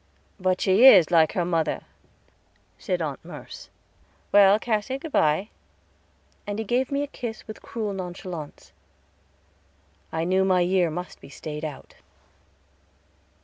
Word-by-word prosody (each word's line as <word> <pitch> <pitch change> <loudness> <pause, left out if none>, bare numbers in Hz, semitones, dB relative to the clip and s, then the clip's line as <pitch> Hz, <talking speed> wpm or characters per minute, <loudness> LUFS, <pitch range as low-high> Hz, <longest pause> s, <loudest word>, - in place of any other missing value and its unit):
"But 185 0 0
she 200 +7 +6
is 185 -10 +7
like 160 -2 +4
her 175 - 0
mother," 165 -2 -1 1.0
said - - -2
Aunt - - -5
Merce. - - -11 0.6
"Well, 200 0 +6
Cassy, 220 +3 -2
good 310 +3 -9
by"; 155 - +2 1.0
and 205 0 -3
he 220 - -3
gave 250 +5 0
me 280 +1 0
a - - -4
kiss 235 -5 -7
with 215 - -9
cruel 215 -3 -4
nonchalance. 180 -4 -7 1.4
I 160 0 -2
knew 185 +2 +2
my 185 -1 +3
year 180 -1 +2
must 180 +3 -7
be - - -13
stayed 150 +1 -7
out. 150 -4 -8
190 Hz, 135 wpm, -25 LUFS, 170-220 Hz, 1.4 s, is